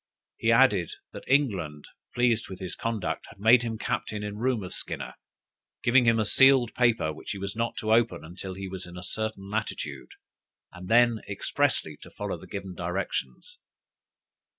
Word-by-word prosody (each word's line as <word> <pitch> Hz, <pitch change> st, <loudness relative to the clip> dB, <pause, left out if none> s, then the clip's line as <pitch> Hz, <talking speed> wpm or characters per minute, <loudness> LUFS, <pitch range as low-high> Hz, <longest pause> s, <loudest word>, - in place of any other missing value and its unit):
He -, -, +2 dB
added, -, -, +4 dB, 0.2 s
that -, -, -9 dB
England, 95 Hz, -, +1 dB, 0.3 s
pleased 120 Hz, -2 st, +2 dB
with 95 Hz, -, -7 dB
his 95 Hz, -2 st, -5 dB
conduct, 115 Hz, -4 st, -3 dB
had -, -, -15 dB
made 115 Hz, +4 st, +6 dB
him 115 Hz, -2 st, -3 dB
captain 110 Hz, -3 st, -3 dB
in 105 Hz, 0 st, -5 dB
room 120 Hz, -3 st, 0 dB
of 90 Hz, -, -6 dB
Skinner, -, -, -4 dB, 0.7 s
giving 125 Hz, 0 st, +5 dB
him 115 Hz, -1 st, +4 dB
a 110 Hz, -, +1 dB
sealed 135 Hz, 0 st, +5 dB
paper, 115 Hz, -10 st, +2 dB
which 75 Hz, -, -10 dB
he -, -, -6 dB
was 100 Hz, +1 st, -5 dB
not 115 Hz, +1 st, -2 dB
to 110 Hz, 0 st, +1 dB
open 115 Hz, -6 st, +2 dB
until 90 Hz, +3 st, -7 dB
he 95 Hz, 0 st, -6 dB
was 95 Hz, -1 st, -6 dB
in 90 Hz, 0 st, -10 dB
a 90 Hz, -, -7 dB
certain 110 Hz, -1 st, -3 dB
latitude, 110 Hz, +1 st, -4 dB, 0.6 s
and 90 Hz, 0 st, -9 dB
then 120 Hz, +1 st, +4 dB
expressly 100 Hz, -, 0 dB
to -, -, -13 dB
follow -, -, -5 dB
the -, -, -12 dB
given 100 Hz, -2 st, -6 dB
directions. 85 Hz, -7 st, -4 dB
105 Hz, 175 wpm, -27 LUFS, 95-120 Hz, 0.7 s, made